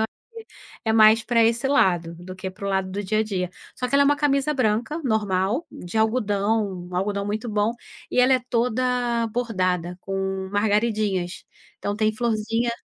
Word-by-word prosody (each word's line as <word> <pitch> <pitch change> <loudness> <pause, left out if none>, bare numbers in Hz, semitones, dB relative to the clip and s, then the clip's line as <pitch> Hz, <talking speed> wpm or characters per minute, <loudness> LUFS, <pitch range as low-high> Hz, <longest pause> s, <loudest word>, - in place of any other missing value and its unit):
acho - - 0
que - - -53 0.6
é 220 - +1
mais 220 0 +6
pra 230 0 +2
esse 235 +3 +1
lado, 175 -11 +2
do 185 +1 -9
que 190 0 -5
para 190 +2 -8
o - - -1
lado 190 -1 0
do 200 +2 -3
dia 215 +3 0
a - - +3
dia. 190 -4 -2 0.3
Só 250 -1 -3
que 275 - -2
ela 280 - +6
é - - +4
uma 290 +1 +4
camisa 285 0 +1
branca, 245 +4 0
normal, 210 - 0
de 175 +5 -8
algodão, 210 -4 0
algodão 200 +2 -1
muito 215 +3 -3
bom, 210 +1 +1 0.4
e - - -1
ela 255 +1 +5
é 255 - +2
toda 245 0 +1
bordada, 185 -7 -1
com 190 0 -3
margaridinhas. 205 -3 0 0.3
Então 205 - -2
tem 215 0 +2
florzinha 225 +1 0
215 Hz, 180 wpm, -24 LUFS, 190-235 Hz, 0.6 s, mais